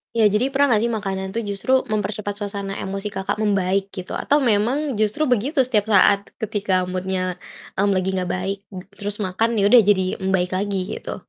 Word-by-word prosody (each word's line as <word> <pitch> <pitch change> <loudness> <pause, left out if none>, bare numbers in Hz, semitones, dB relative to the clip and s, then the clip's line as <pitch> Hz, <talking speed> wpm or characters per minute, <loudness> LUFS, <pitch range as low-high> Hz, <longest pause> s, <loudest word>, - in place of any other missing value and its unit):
Ya, 220 -2 +5
jadi 215 +7 +1
pernah 275 -3 +3
gak 215 - +2
sih 235 - 0
makanan 190 -3 -3
tuh 230 - -2
justru 200 +5 -2 0.2
mempercepat 210 -1 -2
suasana 200 -1 -4
emosi 195 +2 -4
Kakak 200 0 -3
membaik 195 -2 0
gitu, 185 -1 -7
atau 290 -1 +1
memang 240 +3 +1
justru 215 +8 +1
begitu 265 +2 +2
setiap 220 -4 +1
saat 200 -1 +4
ketika 200 -4 -1
mood-nya, 185 0 -3 0.4
mmm, 200 0 +2
lagi 185 0 0
gak 180 - -2
baik 190 +2 -2 0.2
m 185 - -7
terus 205 +1 -4
makan 225 +5 0
ya 205 +1 +3
udah, 245 - +9
jadi 190 -3 +2
membaik 190 -2 0
lagi, 195 0 -1 0.2
gitu? - - -6
200 Hz, 185 wpm, -22 LUFS, 190-220 Hz, 0.4 s, udah